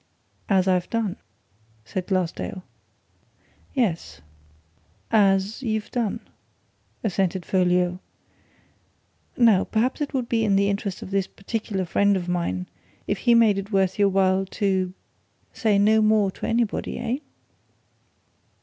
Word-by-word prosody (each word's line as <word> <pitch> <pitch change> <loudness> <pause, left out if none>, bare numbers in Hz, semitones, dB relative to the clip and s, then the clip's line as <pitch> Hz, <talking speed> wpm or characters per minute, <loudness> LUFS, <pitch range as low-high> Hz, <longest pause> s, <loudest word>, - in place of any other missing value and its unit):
"As 190 -2 +3
I've 180 -1 +1
done," 225 -5 -1 0.7
said 185 +10 -4
Glassdale. 185 0 -2 2.6
"As 195 +3 +1
you've 220 -4 -2
done," 235 -5 -1 0.8
assented 190 -3 -1
Folliot. 180 -1 +1 1.4
"Now, 225 -6 +5
perhaps 240 +6 -1
it 290 - -2
would 250 -3 -1
be 230 -1 +1
in 205 -3 +2
the 200 0 +3
interest 200 -1 -4
of 185 - -9
this 195 -1 0
particular 200 -2 -4
friend 200 +3 +2
of 180 -1 -5
mine 170 - -1 0.4
if 200 - -2
he 240 +2 +4
made 220 -4 +4
it 200 +2 -7
worth 190 -1 +1
your 200 -1 +5
while 190 0 +2
to 190 -3 0 0.6
say 215 -4 +2
no 215 +2 +4
more 215 -2 +3
to - - -6
anybody, 230 -1 -1
eh?" 240 +1 -2
195 Hz, 120 wpm, -24 LUFS, 185-220 Hz, 2.6 s, Now